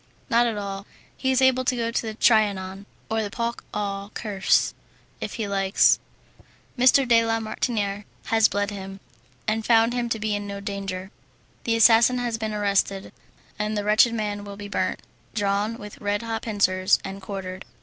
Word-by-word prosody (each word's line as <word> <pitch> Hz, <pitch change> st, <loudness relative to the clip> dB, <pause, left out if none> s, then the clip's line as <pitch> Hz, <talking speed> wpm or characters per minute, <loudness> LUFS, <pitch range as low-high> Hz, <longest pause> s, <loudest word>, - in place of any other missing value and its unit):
"Not 235 Hz, +1 st, +4 dB
at 225 Hz, -2 st, -2 dB
all; 200 Hz, 0 st, -5 dB, 0.3 s
he 265 Hz, -, -2 dB
is 260 Hz, 0 st, +3 dB
able 260 Hz, 0 st, +4 dB
to 255 Hz, 0 st, +1 dB
go 230 Hz, -1 st, -1 dB
to -, -, 0 dB
the 220 Hz, -2 st, -5 dB
Trianon, 200 Hz, -4 st, +2 dB, 0.2 s
or 220 Hz, 0 st, 0 dB
the 210 Hz, -, -3 dB
Parc 235 Hz, +2 st, -3 dB
aux 200 Hz, -1 st, -3 dB
cerfs, 205 Hz, -4 st, +1 dB, 0.5 s
if -, -, -5 dB
he 220 Hz, -4 st, -3 dB
likes. 195 Hz, 0 st, +3 dB, 0.8 s
M. 255 Hz, 0 st, +3 dB, 0.2 s
de 230 Hz, -1 st, +5 dB
la 225 Hz, 0 st, 0 dB
Martiniere 210 Hz, -2 st, -2 dB, 0.2 s
has 225 Hz, -1 st, +4 dB
bled 205 Hz, 0 st, -1 dB
him, 195 Hz, -1 st, -7 dB, 0.5 s
and 220 Hz, +1 st, 0 dB
found 230 Hz, +1 st, +4 dB
him 240 Hz, -1 st, -1 dB
to 230 Hz, -, 0 dB
be 215 Hz, 0 st, -2 dB
in 205 Hz, 0 st, -3 dB
no 200 Hz, 0 st, -5 dB
danger. 195 Hz, -1 st, -5 dB, 0.5 s
The 230 Hz, -, +2 dB
assassin 230 Hz, +2 st, +6 dB
has 240 Hz, -2 st, -2 dB
been 220 Hz, -1 st, -2 dB
arrested, 200 Hz, -2 st, 0 dB, 0.5 s
and 210 Hz, 0 st, -1 dB
the 205 Hz, -, -1 dB
wretched 215 Hz, +3 st, +4 dB
man 205 Hz, -2 st, -3 dB
will 200 Hz, -1 st, -9 dB
be 205 Hz, 0 st, -7 dB
burnt, 205 Hz, -, -2 dB, 0.3 s
drawn 205 Hz, +2 st, 0 dB
with 210 Hz, -2 st, -11 dB
red 205 Hz, +1 st, -1 dB
hot 225 Hz, -1 st, -3 dB
pincers, 185 Hz, -4 st, +2 dB
and 195 Hz, 0 st, -6 dB
quartered." 190 Hz, -1 st, -6 dB
210 Hz, 180 wpm, -24 LUFS, 200-230 Hz, 0.8 s, assassin